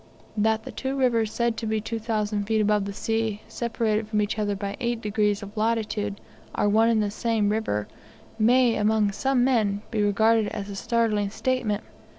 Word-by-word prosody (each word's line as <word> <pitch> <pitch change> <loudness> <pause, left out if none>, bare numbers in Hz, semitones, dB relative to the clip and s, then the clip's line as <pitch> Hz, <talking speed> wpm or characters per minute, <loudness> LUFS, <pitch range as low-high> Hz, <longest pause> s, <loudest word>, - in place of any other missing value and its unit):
That 220 +1 +1
the - - -7
two 265 +1 -3
rivers 230 -5 +2
said 235 -1 0
to 225 - -3
be 220 0 0
2,000 215 -2 -2
feet 220 +1 +1
above 210 -1 +2
the 200 - -4
sea, 225 0 -2
separated 225 -2 -1
from 215 -1 0
each 210 +1 -1
other 205 -1 0
by 200 0 -4
8 240 -2 -1
degrees 210 -2 0
of 200 +2 -10
latitude, 215 -2 -1 0.4
are - - +1
one 220 +2 +4
and 220 -2 +3
the 205 - -2
same 220 -2 0
river, 205 - -1 0.5
may 240 +2 +4
among 210 -1 +2
some 265 +4 +1
men 215 -6 +1
be 220 -2 0
regarded 220 +2 +3
as 205 -2 -5
a - - -6
startling 215 -1 0
statement. 220 -1 -1
220 Hz, 180 wpm, -25 LUFS, 205-230 Hz, 0.5 s, one